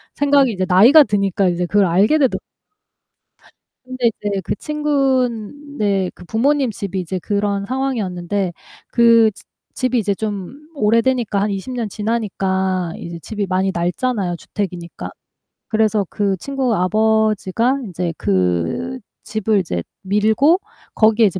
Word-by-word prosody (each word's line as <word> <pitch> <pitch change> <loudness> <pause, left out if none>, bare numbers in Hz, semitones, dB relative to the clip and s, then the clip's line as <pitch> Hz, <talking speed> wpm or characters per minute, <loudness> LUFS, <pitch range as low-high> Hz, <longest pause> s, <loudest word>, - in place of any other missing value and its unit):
생각이 280 -3 +3
이제 185 -1 -1
나이가 240 - +7
드니까 200 -3 +1
이제 175 0 -1
그걸 205 -1 +3
알게 200 - +3
되더 270 -4 +2 1.5
근데 255 -2 -1 0.2
이제 200 -2 -1
그 - - -2
친구네 265 - -1
그 180 - -14
부모님 265 +5 +1
집이 195 -2 -4
이제 185 +1 -3
그런 200 +1 -1
상황이었는데 200 -8 -2 0.4
그 230 -2 +5
즈 - - -15 0.3
집이 255 -2 0
이제 205 -1 0
좀 215 - -6
오래되니까 230 -2 +1
한 210 - 0
20 200 +6 -4
년 235 -3 -2
지나니까 190 -5 -1
이제 170 0 -7
집이 205 +3 -4
많이 190 +1 0
낡잖아요 180 +2 -1
주택이니까. 175 - -6 0.6
그래서 215 -2 +1
그 200 -2 0
친구 265 +1 -1
아버지가 220 +5 +1
인제 175 -3 -3
그 95 - -1 0.2
집을 215 0 0
이제 90 - -3 0.2
밀고 220 - +3 0.4
거기에 220 +1 +4
이제 190 -2 0
210 Hz, 280 characters per minute, -19 LUFS, 190-245 Hz, 1.5 s, 나이가